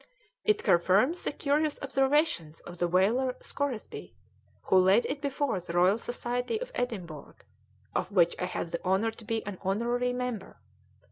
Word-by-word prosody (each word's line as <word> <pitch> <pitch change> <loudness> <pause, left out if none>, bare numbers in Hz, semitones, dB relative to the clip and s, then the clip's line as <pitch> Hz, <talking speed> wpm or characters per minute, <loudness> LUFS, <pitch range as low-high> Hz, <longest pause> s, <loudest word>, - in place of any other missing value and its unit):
"It 425 0 +2
confirms 200 - +3
the - - -1
curious 295 +1 0
observations 270 - +1
of 175 0 -11
the 175 - +2
whaler 225 +9 +2
Scoresby, 280 -6 -5 0.5
who 190 - +3
laid 190 +5 +5
it 280 +1 -3
before 280 -6 -1
the 170 -1 -8
Royal 180 +5 +4
Society 245 - -2
of - - -6
Edinburgh, 180 - -5 0.6
of - - -2
which 175 -4 +4
I - - 0
have 175 -2 -4
the 170 - -4
honour 190 +5 +1
to 225 - -13
be 225 0 -2
an 200 -2 -6
honorary 235 +6 0
member. 245 -5 -4
225 Hz, 155 wpm, -29 LUFS, 185-270 Hz, 0.6 s, laid